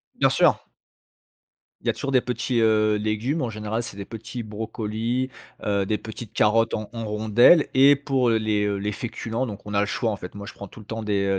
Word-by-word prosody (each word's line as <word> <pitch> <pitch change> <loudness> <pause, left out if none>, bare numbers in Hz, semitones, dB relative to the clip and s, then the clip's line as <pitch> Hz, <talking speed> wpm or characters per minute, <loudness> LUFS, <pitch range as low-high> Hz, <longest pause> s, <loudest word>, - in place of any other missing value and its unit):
Bien - - +3
sûr. - - +4 1.2
Il - - -8
y - - +4
a - - +3
toujours 140 - -4
des 130 - +5
petits, 125 -1 -1
heu, 110 -1 +3
légumes, 110 +8 -1
en 120 - -1
général 110 +2 -3
c'est 105 - -8
des 100 - -6
petits 115 +2 -7
brocolis, 110 +3 -3 0.4
heu, 100 -2 +1
des 105 +1 0
petites 110 +1 -9
carottes 115 +1 +3
en 105 -1 -3
en 115 -1 -4
rondelles 110 +9 +5
et 140 +2 +7
pour, 135 -3 +1
heu, 115 - +3
les, 105 -1 0
heu, 100 -1 0
les 105 +1 -2
féculents, 115 +1 -3
donc 105 -4 -6
on 105 - -6
a 100 - +3
le - - +2
choix, 115 +1 -1
en 105 - -2
fait, 90 - -9
moi 100 0 -7
je - - -8
prends 100 - -9
tout - - -13
le 105 - -12
temps 110 0 -5
des, 100 -2 0
110 Hz, 230 wpm, -24 LUFS, 105-120 Hz, 1.2 s, et